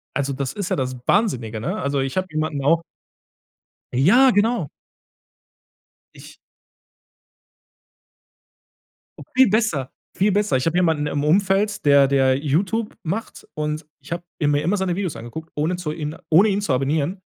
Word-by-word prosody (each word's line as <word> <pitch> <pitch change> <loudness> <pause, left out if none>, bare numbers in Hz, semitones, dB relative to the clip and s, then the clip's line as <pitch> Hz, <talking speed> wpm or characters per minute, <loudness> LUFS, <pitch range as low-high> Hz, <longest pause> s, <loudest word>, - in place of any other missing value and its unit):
Also, 140 0 -1
das 135 -1 -3
ist 200 -4 -4
ja - - +1
das 130 -1 -3
Wahnsinnige, 120 - 0
ne? - - -3
Also, 140 +1 -1
ich 135 +5 -2
habe 185 0 0
jemanden 155 -2 -2
auch 165 +4 +3 1.1
Ja, 200 - +5
genau. 225 +3 +1 1.5
Ich - - -13 3.0
Viel 260 -5 +6
besser, 195 - 0 0.2
viel 205 +2 +2
besser. 205 -7 +1
Ich 130 - -2
habe 165 +2 +1
jemanden 160 -4 +1
im 145 0 -2
Umfeld, 195 +5 +1
der 140 -1 +6
der 135 -1 +3
YouTube 185 +10 -1
macht 195 +8 -5
und 150 0 -3
ich 145 - -16
habe 170 0 -3 0.2
mir 145 -1 +2
immer 180 +6 0
seine 190 -2 -1
Videos 185 -7 -3
angeguckt, 120 +8 -8
ohne 155 +4 0
zu 175 -4 -4
ihn 155 -1 -5
ohne 190 +7 +5
ihn 200 +1 0
zu 195 - -2
abonnieren. 145 +7 0
155 Hz, 150 wpm, -22 LUFS, 140-195 Hz, 3.0 s, Viel